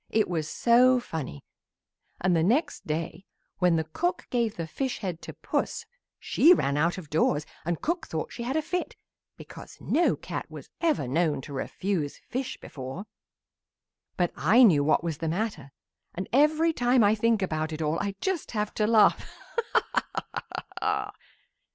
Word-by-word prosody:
it 220 Hz, -1 st, +2 dB
was 160 Hz, -3 st, -2 dB
so 250 Hz, +2 st, +4 dB
funny, 155 Hz, -, -6 dB, 0.8 s
and 180 Hz, -1 st, +2 dB
the 165 Hz, -, +3 dB
next 240 Hz, -, +1 dB
day 160 Hz, +4 st, -3 dB, 0.4 s
when 180 Hz, -2 st, +4 dB
the 160 Hz, -, +1 dB
cook 350 Hz, -, -2 dB
gave 235 Hz, -4 st, 0 dB
the 165 Hz, -, -4 dB
fish 260 Hz, -, -3 dB
head 180 Hz, -5 st, -5 dB
to -, -, -7 dB
Puss 460 Hz, -, -3 dB, 0.3 s
she 350 Hz, +4 st, +5 dB
ran 140 Hz, -, 0 dB
out 165 Hz, +5 st, +1 dB
of 180 Hz, -5 st, -8 dB
doors 155 Hz, -1 st, +2 dB, 0.2 s
and 170 Hz, -1 st, -2 dB
cook 340 Hz, 0 st, -1 dB
thought 160 Hz, -, -4 dB
she -, -, -7 dB
had 250 Hz, +4 st, -2 dB
a 315 Hz, -, 0 dB
fit 360 Hz, +3 st, -3 dB, 0.4 s
because -, -, -11 dB
no 340 Hz, +3 st, +2 dB
cat -, -, -6 dB
was -, -, -11 dB
ever 310 Hz, -, +1 dB
known 155 Hz, +3 st, +1 dB
to 140 Hz, +2 st, -9 dB
refuse 155 Hz, +2 st, -2 dB
fish 260 Hz, +1 st, -5 dB
before. 135 Hz, +8 st, -7 dB, 1.1 s
"But 175 Hz, -2 st, +1 dB
I 215 Hz, -, +5 dB
knew 160 Hz, -11 st, +6 dB
what 155 Hz, +3 st, +2 dB
was 165 Hz, -3 st, -3 dB
the 165 Hz, -, -1 dB
matter, 170 Hz, -, -3 dB, 0.4 s
and 185 Hz, +2 st, -4 dB
every 310 Hz, +4 st, +4 dB
time 245 Hz, -3 st, +3 dB
I 205 Hz, +1 st, +5 dB
think 220 Hz, -1 st, +2 dB
about 155 Hz, -3 st, -2 dB
it 155 Hz, -, -5 dB
all 155 Hz, +1 st, 0 dB
I 200 Hz, -1 st, -2 dB
just 380 Hz, -4 st, -1 dB
have 210 Hz, 0 st, -1 dB
to 210 Hz, -, +1 dB
laugh. 220 Hz, -1 st, +5 dB, 0.5 s
Ha! -, -, +5 dB
ha! -, -, -3 dB, 0.4 s
ha!" -, -, -1 dB
190 Hz, 170 wpm, -27 LUFS, 160-245 Hz, 1.1 s, knew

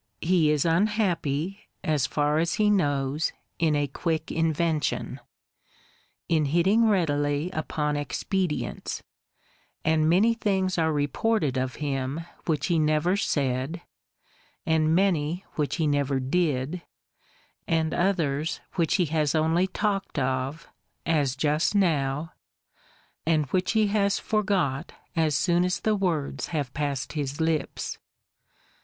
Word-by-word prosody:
He 170 Hz, -3 st, +3 dB
is 150 Hz, 0 st, +2 dB
unhappy, 180 Hz, -2 st, 0 dB, 0.2 s
as 150 Hz, -4 st, +1 dB
far 150 Hz, +1 st, +1 dB
as 170 Hz, +1 st, +1 dB
he 210 Hz, -1 st, +3 dB
knows, 145 Hz, -5 st, +1 dB, 0.3 s
in 160 Hz, -3 st, +2 dB
a 145 Hz, 0 st, +1 dB
quick 160 Hz, +3 st, -2 dB
invention; 160 Hz, -1 st, 0 dB, 1.1 s
in 160 Hz, -3 st, +2 dB
hitting 190 Hz, +10 st, +3 dB
readily 145 Hz, -3 st, +1 dB
upon 150 Hz, -2 st, -2 dB
expedients; 150 Hz, +4 st, -2 dB, 0.8 s
and 155 Hz, 0 st, +3 dB
many 205 Hz, +7 st, +4 dB
things 190 Hz, -5 st, 0 dB
are 160 Hz, -1 st, +2 dB
reported 150 Hz, -, 0 dB
of 130 Hz, 0 st, -1 dB
him 140 Hz, +1 st, -2 dB, 0.3 s
which 150 Hz, -4 st, 0 dB
he 170 Hz, -3 st, +2 dB
never 155 Hz, +4 st, +2 dB
said, 140 Hz, -2 st, -1 dB, 0.8 s
and 160 Hz, -1 st, +2 dB
many 175 Hz, -2 st, +1 dB
which 150 Hz, -2 st, -1 dB
he 165 Hz, -, 0 dB
never 140 Hz, -2 st, +1 dB
did, 150 Hz, +2 st, 0 dB, 0.9 s
and 160 Hz, -1 st, +1 dB
others 165 Hz, -5 st, 0 dB
which 165 Hz, -4 st, +1 dB
he 180 Hz, -, +3 dB
has 155 Hz, -1 st, 0 dB
only 160 Hz, +4 st, +2 dB
talked 195 Hz, 0 st, -2 dB
of, 130 Hz, +4 st, -1 dB, 0.4 s
(as 145 Hz, -5 st, +1 dB
just 150 Hz, +6 st, +1 dB
now,) 155 Hz, -5 st, +1 dB, 0.9 s
and 155 Hz, -2 st, +3 dB
which 185 Hz, +2 st, +1 dB
he 220 Hz, -1 st, +4 dB
has 200 Hz, -1 st, +2 dB
forgot 190 Hz, -, 0 dB, 0.2 s
as 160 Hz, -3 st, +2 dB
soon 175 Hz, +3 st, +2 dB
as 180 Hz, +1 st, 0 dB
the 215 Hz, -1 st, +2 dB
words 170 Hz, -8 st, -1 dB
have 145 Hz, -6 st, -3 dB
passed 140 Hz, -4 st, -2 dB
his 145 Hz, -1 st, -3 dB
lips. 160 Hz, -2 st, -1 dB
160 Hz, 125 wpm, -26 LUFS, 145-180 Hz, 1.1 s, many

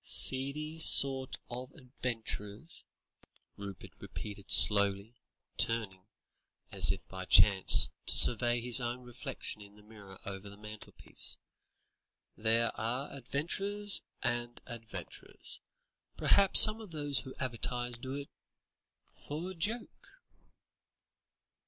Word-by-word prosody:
"Seedy 150 Hz, +4 st, +3 dB
sort 135 Hz, -4 st, +5 dB
of 125 Hz, +2 st, -8 dB
adventurers," 120 Hz, -2 st, -7 dB, 0.7 s
Rupert 100 Hz, -3 st, -10 dB
repeated 100 Hz, -2 st, -10 dB
slowly, 100 Hz, +1 st, +4 dB, 0.4 s
turning, 105 Hz, -5 st, 0 dB, 0.6 s
as -, -, +3 dB
if -, -, -7 dB
by 95 Hz, 0 st, -8 dB
chance, 95 Hz, 0 st, +5 dB, 0.2 s
to -, -, +1 dB
survey 120 Hz, 0 st, +2 dB
his 125 Hz, +1 st, +5 dB
own 120 Hz, +1 st, -5 dB
reflection 120 Hz, -3 st, -8 dB
in 100 Hz, 0 st, -16 dB
the 105 Hz, -, -20 dB
mirror 100 Hz, -3 st, -15 dB
over 100 Hz, 0 st, -7 dB
the 100 Hz, -, -15 dB
mantelpiece; 105 Hz, 0 st, -8 dB, 1.0 s
"there 115 Hz, +1 st, -1 dB
are 125 Hz, +5 st, -4 dB
adventurers 195 Hz, -, +1 dB, 0.2 s
and 120 Hz, -1 st, -4 dB
adventurers. 115 Hz, -2 st, -5 dB, 0.6 s
Perhaps 195 Hz, -1 st, +4 dB
some 215 Hz, +1 st, +8 dB
of 215 Hz, -, -12 dB
those 145 Hz, -4 st, -1 dB
who 130 Hz, +1 st, -10 dB
advertise 120 Hz, -1 st, -4 dB
do 130 Hz, +2 st, -7 dB
it 140 Hz, 0 st, -9 dB, 1.0 s
for 160 Hz, +6 st, -6 dB
a -, -, -9 dB
joke." 210 Hz, +8 st, -5 dB
120 Hz, 110 wpm, -31 LUFS, 105-140 Hz, 1.0 s, some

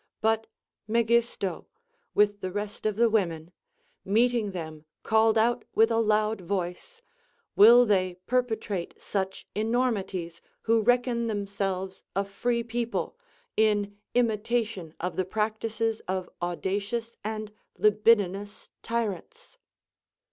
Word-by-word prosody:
But 220 Hz, 0 st, +1 dB, 0.4 s
Megisto, 230 Hz, -4 st, +1 dB, 0.5 s
with 205 Hz, -1 st, +3 dB
the 185 Hz, -, -3 dB
rest 205 Hz, +2 st, -3 dB
of 215 Hz, -, -1 dB
the 235 Hz, +2 st, +4 dB
women, 175 Hz, -7 st, 0 dB, 0.5 s
meeting 230 Hz, +1 st, +2 dB
them 160 Hz, -4 st, -7 dB, 0.2 s
called 220 Hz, 0 st, +3 dB
out 235 Hz, +2 st, +2 dB
with 225 Hz, +1 st, +5 dB
a 225 Hz, -, +2 dB
loud 215 Hz, -1 st, +1 dB
voice: 185 Hz, -, -4 dB, 0.5 s
Will 235 Hz, +4 st, +8 dB
they 185 Hz, -4 st, +1 dB
perpetrate 220 Hz, -7 st, -2 dB
such 190 Hz, -1 st, -3 dB
enormities 210 Hz, -7 st, -1 dB, 0.2 s
who 225 Hz, 0 st, +3 dB
reckon 240 Hz, 0 st, +2 dB
themselves 195 Hz, -3 st, -3 dB
a 195 Hz, +1 st, +1 dB
free 235 Hz, +4 st, -1 dB
people, 235 Hz, -, -3 dB, 0.4 s
in 205 Hz, -2 st, +2 dB, 0.2 s
imitation 225 Hz, -6 st, 0 dB
of 180 Hz, +1 st, -3 dB
the 185 Hz, -, +2 dB
practices 220 Hz, +2 st, -1 dB
of 185 Hz, 0 st, -3 dB
audacious 200 Hz, +6 st, -2 dB
and 215 Hz, 0 st, -4 dB, 0.3 s
libidinous 205 Hz, -2 st, +2 dB
tyrants? 235 Hz, -, -4 dB
215 Hz, 110 wpm, -27 LUFS, 195-230 Hz, 0.5 s, Will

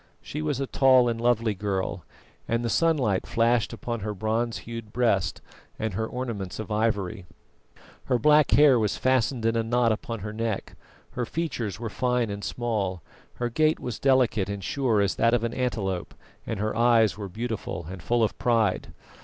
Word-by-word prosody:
She 150 Hz, -, -6 dB
was 150 Hz, -4 st, -1 dB
a 135 Hz, -, 0 dB
tall 130 Hz, -2 st, +4 dB
and 115 Hz, -1 st, -1 dB
lovely 115 Hz, -2 st, +2 dB
girl, 100 Hz, -1 st, -3 dB, 0.4 s
and 115 Hz, +1 st, 0 dB
the 115 Hz, -, 0 dB
sunlight 135 Hz, -, +2 dB
flashed 115 Hz, 0 st, +2 dB
upon 120 Hz, -1 st, -4 dB
her 105 Hz, +1 st, -4 dB
bronze 110 Hz, +3 st, -1 dB
hued 115 Hz, -2 st, -7 dB
breast 100 Hz, -8 st, +1 dB, 0.4 s
and 110 Hz, -2 st, -2 dB
her 110 Hz, +3 st, -2 dB
ornaments 115 Hz, -8 st, -4 dB
of 110 Hz, 0 st, -6 dB
ivory. 105 Hz, -3 st, -1 dB, 0.8 s
Her 125 Hz, -, +2 dB
black 150 Hz, +3 st, +5 dB
hair 140 Hz, -4 st, +6 dB
was 105 Hz, -2 st, 0 dB
fastened 130 Hz, -2 st, +1 dB
in 115 Hz, 0 st, +2 dB
a 115 Hz, -, +2 dB
knot 115 Hz, +1 st, +2 dB
upon 110 Hz, 0 st, -4 dB
her 105 Hz, +2 st, -5 dB
neck, 110 Hz, -2 st, -3 dB, 0.4 s
her 125 Hz, -2 st, -3 dB
features 120 Hz, -, -3 dB
were 115 Hz, -2 st, -4 dB
fine 125 Hz, -3 st, 0 dB
and 100 Hz, 0 st, -6 dB
small, 100 Hz, -8 st, -2 dB, 0.3 s
her 120 Hz, 0 st, -2 dB
gait 155 Hz, +5 st, +2 dB
was 125 Hz, -4 st, -5 dB
delicate 125 Hz, -7 st, +2 dB
and 100 Hz, -1 st, -4 dB
sure 120 Hz, -1 st, +1 dB
as 100 Hz, -1 st, +1 dB
that 115 Hz, +1 st, +4 dB
of 120 Hz, -, -1 dB
an 115 Hz, 0 st, -1 dB
antelope, 100 Hz, -8 st, -2 dB, 0.3 s
and 110 Hz, -, -3 dB
her 105 Hz, +1 st, -1 dB
eyes 115 Hz, -3 st, +4 dB
were 100 Hz, -2 st, -6 dB
beautiful 110 Hz, -5 st, -4 dB
and 95 Hz, 0 st, -7 dB
full 115 Hz, +7 st, +1 dB
of 110 Hz, -, 0 dB
pride. 115 Hz, -5 st, +1 dB
115 Hz, 180 wpm, -26 LUFS, 105-125 Hz, 0.8 s, hair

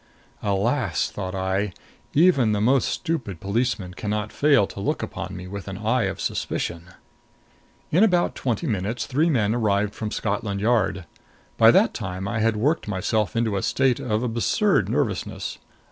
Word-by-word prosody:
Alas, 105 Hz, +7 st, 0 dB
thought 95 Hz, -1 st, -5 dB
I, 95 Hz, +1 st, -1 dB, 0.4 s
even 140 Hz, -9 st, +4 dB
the 105 Hz, -, 0 dB
most 130 Hz, +5 st, +3 dB
stupid 135 Hz, -, -3 dB
policeman 100 Hz, -2 st, -1 dB
can 105 Hz, +3 st, -5 dB
not 105 Hz, 0 st, -2 dB
fail 140 Hz, -8 st, +4 dB
to 100 Hz, -, -9 dB
look 100 Hz, -, -1 dB
upon -, -, -5 dB
me 90 Hz, -, -7 dB
with 100 Hz, +1 st, -7 dB
the 95 Hz, -1 st, -6 dB
eye 115 Hz, +3 st, +1 dB
of -, -, -3 dB
suspicion! 85 Hz, 0 st, -3 dB, 1.0 s
In 180 Hz, +7 st, +5 dB
about 180 Hz, -5 st, +3 dB
twenty 125 Hz, +5 st, -2 dB
minutes 110 Hz, -, -2 dB
three 150 Hz, +5 st, +1 dB
men 110 Hz, -8 st, +2 dB
arrived 105 Hz, -3 st, +1 dB
from 110 Hz, -, -4 dB
Scotland 100 Hz, -2 st, -2 dB
Yard. 105 Hz, -4 st, +1 dB, 0.5 s
By -, -, +7 dB
that -, -, +4 dB
time 95 Hz, +1 st, -4 dB
I 110 Hz, +2 st, -2 dB
had 110 Hz, 0 st, +2 dB
worked 140 Hz, +6 st, 0 dB
myself 105 Hz, +1 st, 0 dB
up -, -, -22 dB
into 115 Hz, -3 st, +1 dB
a -, -, -1 dB
state 130 Hz, +2 st, +1 dB
of 110 Hz, -1 st, -1 dB
absurd 120 Hz, -, +1 dB
nervousness. 115 Hz, -6 st, -2 dB
110 Hz, 165 wpm, -24 LUFS, 100-125 Hz, 1.0 s, By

